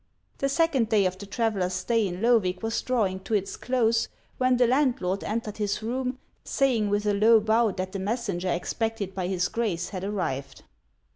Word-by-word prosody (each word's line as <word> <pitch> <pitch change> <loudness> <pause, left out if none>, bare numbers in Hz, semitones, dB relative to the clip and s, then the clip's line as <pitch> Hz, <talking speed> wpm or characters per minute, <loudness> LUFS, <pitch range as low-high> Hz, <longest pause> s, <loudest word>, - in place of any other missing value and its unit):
The 275 - +1
second 275 -6 +2
day 205 -3 +3
of 185 0 -1
the 200 - -8
traveller's 200 -4 0
stay 220 +3 +1
in 180 +1 -5
Loevig 210 -6 +2
was 225 0 -1
drawing 210 -7 0
to 205 +3 -2
its 195 -1 -1
close, 230 -3 +1 0.3
when 255 -1 +3
the 245 - +5
landlord 240 -8 +1
entered 215 -1 -3
his 205 0 -2
room, 255 +2 -2 0.3
saying 245 -7 +1
with 205 +1 0
a 205 - +2
low 220 +3 +6
bow 220 +2 +3
that 185 0 -4
the 195 - -4
messenger 195 -3 -2
expected 210 +2 -2
by 185 -2 -2
his 180 -2 0
Grace 195 -7 -2
had 185 -2 -5
arrived. 140 -10 -3
215 Hz, 185 wpm, -26 LUFS, 190-235 Hz, 0.3 s, low